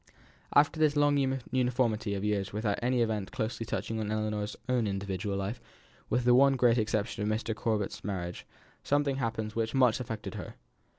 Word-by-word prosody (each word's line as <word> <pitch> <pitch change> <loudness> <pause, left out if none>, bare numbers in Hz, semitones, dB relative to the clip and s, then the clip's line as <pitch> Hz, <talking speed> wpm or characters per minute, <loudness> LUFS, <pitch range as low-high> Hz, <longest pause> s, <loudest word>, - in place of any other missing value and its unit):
After 145 +2 +4
this 155 -1 +3
long 145 0 +4 0.4
uniformity 120 -5 +1
of 100 - -3
years 105 -2 0
without 105 -1 -1
any 125 0 +2
event 110 -4 -2
closely 110 0 -3
touching 110 0 -2
on 105 -1 -2
Ellinor's 105 -1 -2
own 125 -4 +1
individual 100 0 -2
life, 100 +5 -3 0.5
with 125 - +1
the 125 - +6
one 135 +2 +6
great 120 -2 +4
exception 110 0 -1
of 105 - 0
Mr. 110 +1 -1
Corbet's 110 -2 -2
marriage, 90 -3 -4 0.4
something 145 -1 +1
happened 110 -3 -2
which 115 +1 -2
much 125 -3 +4
affected 110 -3 -5
her. - - -7
110 Hz, 170 wpm, -30 LUFS, 105-125 Hz, 0.5 s, the